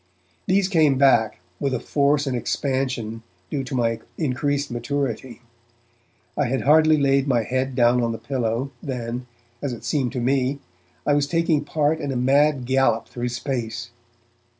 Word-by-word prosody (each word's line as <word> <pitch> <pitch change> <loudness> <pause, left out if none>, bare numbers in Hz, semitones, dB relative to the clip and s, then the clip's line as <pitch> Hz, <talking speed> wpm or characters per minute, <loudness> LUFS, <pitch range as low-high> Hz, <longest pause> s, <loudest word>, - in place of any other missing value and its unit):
These 190 0 +3
came 155 -7 +3
back, 120 -8 +3 0.2
with 135 -2 0
a - - -2
force 145 +2 +1
and 135 -2 -1
expansion 125 -3 -2 0.3
due 140 - -1
to 130 - -5
my 115 -2 +1 0.2
increased 145 -1 -1
maturity. 120 -1 -3 0.9
I 145 -3 +1
had 130 +2 -1
hardly 155 +1 +5
laid 140 -1 +2
my 120 -4 +2
head 130 +3 -2
down 120 0 +4
on 115 -1 0
the 115 - -4
pillow, 125 0 -2
than, 125 -2 -4 0.3
as 140 -3 -2
it 115 - -9
seemed 135 -5 0
to 130 - -2
me, 130 +2 +1 0.5
I 145 - +3
was 145 0 +2
taking 165 -2 +1
part 150 +1 0
in 145 -3 -3
a - - -3
mad 135 +2 +3
gallop 130 -3 +2
through 120 0 -3
space. 120 -2 -4
135 Hz, 160 wpm, -23 LUFS, 120-145 Hz, 0.9 s, hardly